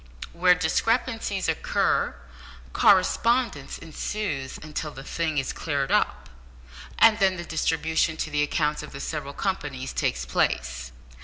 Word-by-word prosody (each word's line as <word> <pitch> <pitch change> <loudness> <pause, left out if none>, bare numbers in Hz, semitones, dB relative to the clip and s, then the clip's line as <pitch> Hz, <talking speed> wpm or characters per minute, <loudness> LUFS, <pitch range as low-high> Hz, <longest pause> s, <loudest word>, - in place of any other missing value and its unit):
Where 180 +1 +5
discrepancies 210 +3 0
occur, 160 - +1 0.6
correspondence 205 - +3
ensues 160 -4 -4
until 155 0 -4
the 135 -2 -10
thing 160 +1 -2
is 135 -1 -1
cleared 140 -4 -2
up, - - +1 0.7
and 225 -1 +6
then 190 -2 +3
the 175 - -6
distribution 160 0 0
to 160 - -3
the 150 0 +1
accounts 150 0 0
of - - -10
the 140 - -7
several 140 -1 -4
companies 145 -9 -3
takes 65 0 -1
place. - - -1
160 Hz, 130 wpm, -26 LUFS, 140-185 Hz, 0.7 s, and